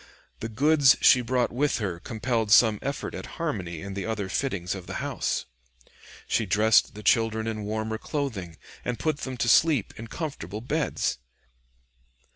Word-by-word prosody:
The 115 - -4
goods 140 +3 +4
she 125 - +6
brought 125 0 0
with 145 +4 +1
her 95 -6 -3
compelled 115 +2 -2
some 110 -2 +6
effort 140 +1 -4
at - - -6
harmony 95 - -3
in 100 0 -6
the 100 +1 -4
other 105 -4 -3
fittings 95 -6 -2
of 95 -3 -8
the - - -6
house. - - -2 0.8
She 110 - 0
dressed 105 +3 +3
the 105 - -9
children 110 -1 +2
in 110 -2 -3
warmer 110 +1 -3
clothing 110 - -4 0.3
and 125 -1 -2
put 155 -2 -1
them 130 -3 -5
to 120 - 0
sleep 145 -1 +4
in 115 - -7
comfortable 110 - -5
beds. 145 - -1
110 Hz, 160 wpm, -26 LUFS, 105-130 Hz, 0.8 s, she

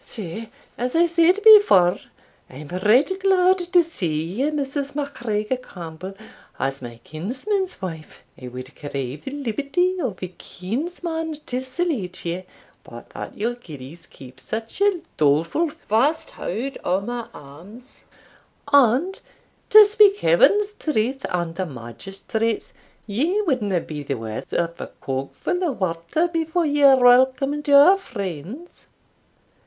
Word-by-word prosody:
Sae, 220 +1 -7 0.3
as 250 +3 -2
I 340 +1 +5
said 340 +4 +3
before, 210 - +7 0.5
I - - -14
am 145 +1 -9
right 210 - +3
glad 375 -1 +4
to 355 0 +3
see 170 - -2
you, 215 - -1
Mrs. 280 -1 -3
MacGregor 240 -5 -2
Campbell, 180 -5 -9 0.4
as 135 +1 -2
my 120 -2 -9
kinsman's 265 - -3
wife. 160 -4 -7 0.2
I 125 - -7
wad 130 +2 -9
crave 140 -1 -6
the - - -3
liberty 290 - -1
of 215 - -4
a 185 - -4
kinsman 320 - -5
to 255 +1 -3
salute 260 - -3
you, 170 +2 -2 0.4
but - - -12
that - - -8
your 230 +4 -1
gillies 160 - -12
keep 130 -1 -14
such 225 - -6
a 400 -4 +3 0.2
dolefu' 165 - +2
fast 290 - 0
haud 275 - -5
o' 185 +2 +1
my 240 +2 -5
arms, 180 - -12 0.7
and, 280 +8 +4 0.5
to 430 0 +10
speak 415 -1 +5
Heaven's 420 -3 +3
truth 270 - -2
and 170 -1 -3
a 185 - -1
magistrate's, 195 - -4 0.3
ye 295 - 0
wadna 215 - 0
be 150 -2 -7
the 140 -1 -3
waur 110 -1 -5
of 170 0 -2
a - - -5
cogfu' 135 - -3
o' 350 -5 +1
water 185 - -1
before 330 0 -1
ye 290 -1 0
welcomed 265 +3 +4
your 285 +7 +7
friends." 205 - -8
240 Hz, 135 wpm, -22 LUFS, -, 0.7 s, to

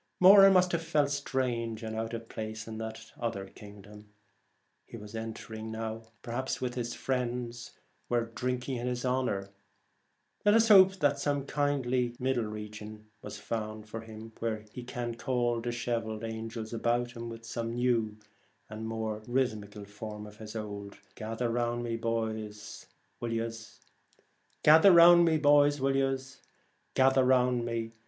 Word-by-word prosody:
Moran 195 +1 +9
must 180 -1 +4
have 170 - 0
felt 150 -3 +1
strange 120 -5 -2
and 110 0 -4
out 115 +1 -3
of 115 0 -7
place 110 0 -6
in 110 -1 -6
that 110 0 -7
other 115 -5 -3
kingdom 105 +1 -13 0.8
he - - -9
was 105 0 -11
entering, 110 0 -6 0.5
perhaps 125 +2 -3
while 125 -1 -2
his 120 -1 -4
friends 125 -2 -3 0.4
were 120 -1 +1
drinking 125 +2 -3
in 120 +1 -3
his 125 0 -2
honour. 125 -7 -1 0.9
Let 205 +1 +5
us 225 0 +4
hope 190 -2 +8
that 145 -1 +2
some 145 -1 -1
kindly 130 -5 0
middle 125 -2 0
region 105 0 -8
was 105 0 -7
found 110 -1 -5
for 110 +1 -6
him, 110 0 -10
where 110 -2 -3
he 125 - -7
can 120 -1 -4
call 120 0 -1
dishevelled 115 -2 -3
89 115 - -3
The - - -5
angels 110 0 -6
about 120 +1 0
him 115 -1 -7
with 115 0 -9
some 115 0 -4
new 115 -3 +1 0.5
and 110 - -6
Twilight, - - -4
more 110 -1 -3
rhythmical 110 -5 -2
form 105 +1 -8
of 105 0 -13
his 110 0 -9
old 100 -2 -6 0.2
Gather 115 +2 -3
round 120 0 -1
me, 115 -1 -2
boys, 110 -2 -4 0.3
will 120 -1 -3
yez 115 -1 -4 0.8
Gather 160 +6 +8
round 170 0 +8 2.4
me? 115 -1 -3
115 Hz, 145 wpm, -30 LUFS, 110-125 Hz, 2.4 s, Moran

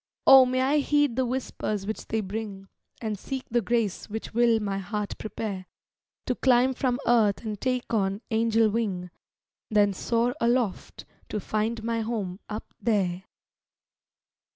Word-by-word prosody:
O 265 -1 +9
may 255 +1 +1
I 275 +3 +3
heed 290 -3 +2
the 260 0 +1
whispers 225 -5 -3
which 215 +2 -5
they 220 0 0
bring, 200 -1 -6 0.4
And 215 -3 -2
seek 265 +2 -5
the 240 +1 +3
grace 225 -3 -1
which 220 +2 -6
will 235 -1 +4
my 200 -2 -2
heart 205 +2 -3
prepare 200 -4 -5 0.6
To 255 - +1
climb 255 +1 +3
from 255 -1 0
earth 220 -4 +3
and 210 -2 -4
take 255 -2 -1
on 200 -1 0
angel 225 0 +3
wing, 190 -6 -2 0.6
Then 205 -2 +3
soar 235 +5 0
aloft, 235 -4 0 0.2
to 210 - -2
find 220 +2 -2
my 230 0 -1
home 210 -5 -3
up 215 +1 -6
there! 190 -5 0
220 Hz, 150 wpm, -27 LUFS, 205-240 Hz, 0.6 s, O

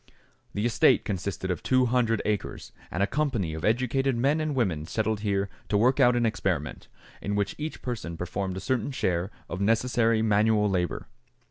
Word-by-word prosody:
The 105 +2 0
estate 120 - +4
consisted 95 -1 -3
of 90 - -3
two 130 -1 +3
hundred 115 -2 +1
acres, 105 -2 -3 0.2
and 95 - -1
a - - +5
company 115 - -1
of 80 - -6
educated 130 +3 +1
men 140 +6 +2
and 155 -2 -1
women 90 -11 0
settled 110 +2 -1
here 100 -2 0 0.2
to 105 - +2
work 125 +6 +3
out 125 -2 +5
an 120 -1 +2
experiment, 95 -9 -2 0.3
in 100 - -2
which 100 -1 0
each 155 +1 -5
person 110 -10 -4
performed 95 +2 -3
a - - -5
certain 130 -2 -1
share 95 -8 -1 0.2
of 85 +3 -5
necessary 115 +1 +2
manual 105 0 +3
labor. 90 -3 -1
110 Hz, 175 wpm, -27 LUFS, 95-125 Hz, 0.3 s, a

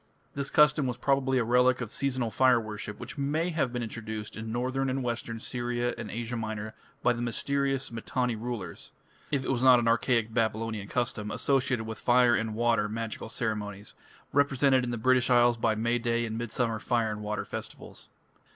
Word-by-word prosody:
This 140 0 -3
custom 150 -2 +4
was 125 -1 -3
probably 135 0 +1
a 125 - +2
relic 125 +2 +3
of 120 -3 -5
seasonal 130 -4 -1
fire 130 -1 +4
worship, 105 -1 -6
which - - -8
may 155 +5 0
have 155 -6 0
been 120 -1 -3
introduced 110 -2 -6
into 110 0 -6
Northern 130 +3 -1
and 130 0 -1
Western 115 -1 -3
Syria 120 0 -2
and 105 - -6
Asia 120 +3 -4
Minor 110 -1 -4 0.3
by 125 - +4
the 120 - -5
mysterious 135 +2 -1
Mitanni 120 +1 -1
rulers, 115 -3 -6 0.4
if 140 -3 0
it - - 0
was 125 -2 0
not 130 -1 +7
an 120 -1 0
archaic 115 -1 +2
Babylonian 110 -2 -1
custom 115 -3 -2
associated 130 -2 +1
with 110 0 -6
fire 120 0 +4
and 110 -1 -1
water 115 -2 +2
magical 110 0 -5
ceremonies, 105 -3 -4 0.4
represented 140 -2 +3
in 125 - -2
the 120 - -2
British 130 +2 +3
Isles 120 -1 +5
by 110 -1 +1
May 115 +2 0
Day 120 0 0
and 110 -1 -4
Midsummer 115 0 -1
fire 115 -2 0
and 105 0 -5
water 105 0 -3
festivals. - - -8
120 Hz, 185 wpm, -29 LUFS, 110-130 Hz, 0.4 s, not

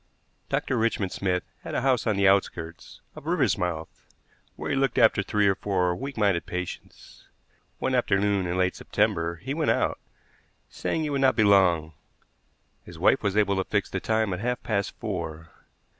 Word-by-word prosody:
Dr. 130 - 0
Richmond 110 -4 0
Smith 90 -3 -1 0.2
had - - -7
a - - +1
house 130 -4 +1
on 110 - +2
the 100 0 +3
outskirts 85 -4 -1
of - - -11
Riversmouth, 80 -3 -1 0.5
where - - -4
he - - +1
looked 135 -2 0
after 110 - +5
three 105 +1 +1
or 100 - +4
four 90 -2 0
weak 135 +3 -6
minded 100 -6 +1
patients. 90 0 -7 0.5
One 130 - -1
afternoon 100 -5 +1
in 90 +1 -2
late 95 0 +1
September 85 -6 0
he 100 +11 -5
went 155 0 0
out, - - +1 0.7
saying 160 - -2
he 150 - -2
would 140 -1 0
not 135 -1 +4
be 110 - +3
long. 90 -6 +4 0.9
His - - -12
wife - - +3
was 100 0 -1
able 100 -2 +2
to 95 - +1
fix 100 +1 -1
the 95 - -2
time 110 -1 0
at 90 - -4
half 125 +3 -2
past 100 -3 -1
four. 80 -6 -5
100 Hz, 175 wpm, -26 LUFS, 90-110 Hz, 0.9 s, after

